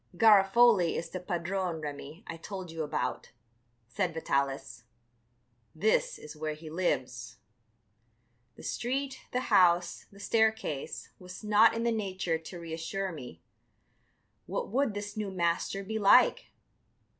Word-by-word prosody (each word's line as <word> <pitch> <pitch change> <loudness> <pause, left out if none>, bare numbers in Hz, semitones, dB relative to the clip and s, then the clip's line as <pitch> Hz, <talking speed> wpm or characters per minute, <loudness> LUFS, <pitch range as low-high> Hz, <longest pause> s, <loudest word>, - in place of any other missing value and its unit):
"Garofoli 205 -2 +5
is 165 - -4
the 185 - -4
padrone, 180 0 -2
Remi, 150 +4 -7
I 170 - -6
told 185 +1 -7
you 165 0 -4
about," 145 -4 -3 0.6
said 170 +7 -2
Vitalis; 135 -6 -2 0.9
"this 215 +7 +1
is 150 - -10
where 155 0 -3
he 155 0 -10
lives." 125 -8 -2 1.2
The - - -13
street, 270 +3 -2
the 250 - 0
house, 175 -2 +4
the 200 - -16
staircase 220 -10 0
was 180 +3 -10
not 215 +2 +5
in 230 - -1
the 235 - +2
nature 190 -6 -1
to 170 +2 -9
reassure 170 +4 -4
me. 125 - -10 1.0
What - - -3
would 245 -2 0
this 205 0 -5
new 210 -2 -3
master 180 +2 -1
be 220 +3 -3
like? 200 -1 +5
180 Hz, 130 wpm, -30 LUFS, 160-205 Hz, 1.2 s, Garofoli